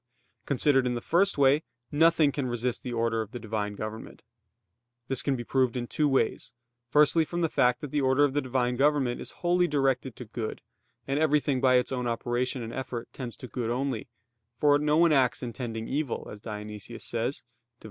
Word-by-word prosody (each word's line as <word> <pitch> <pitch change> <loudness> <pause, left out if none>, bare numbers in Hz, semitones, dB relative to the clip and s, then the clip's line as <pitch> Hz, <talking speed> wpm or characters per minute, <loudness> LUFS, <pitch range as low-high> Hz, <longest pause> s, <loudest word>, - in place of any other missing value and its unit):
Considered 135 -1 +3
in 125 - -1
the - - -2
first 180 +9 +2
way, 140 +2 +5 0.3
nothing 160 -1 +4
can 140 -2 -2
resist 120 0 -2
the 125 - -5
order 115 -1 0
of 110 -1 -8
the 120 - -5
Divine 105 -2 -3
government. 110 +2 -7 0.9
This 135 -2 +1
can 140 - 0
be 120 - -4
proved 130 0 +1
in 120 - -2
two 150 +5 0
ways: 135 -4 0 0.4
firstly 150 +4 +5
from 175 +2 -3
the 165 - +2
fact 125 -4 +2
that 150 - -6
the 150 - +1
order 130 +2 +3
of 145 -2 +2
the 145 - +1
Divine 125 -1 0
government 140 -3 +2
is - - -4
wholly 175 0 +1
directed 135 -4 0
to 125 - -8
good, 110 0 -5 0.5
and 135 +2 0
everything 150 -4 +2
by 130 -1 +5
its 125 +1 +2
own 125 -2 -2
operation 120 +2 -1
and 115 +1 -6
effort 125 -3 -5
tends 125 -3 -6
to 125 - -8
good 120 -1 -3
only, 125 -1 -2 0.5
"for 145 +2 +4
no 150 +1 +2
one 170 0 +5
acts 130 -3 +2
intending 115 -2 -5
evil," 145 -2 -2
as 105 - -10
Dionysius 105 +1 -7
says 120 +4 -2
(Div. - - -44
130 Hz, 200 wpm, -28 LUFS, 120-145 Hz, 0.9 s, way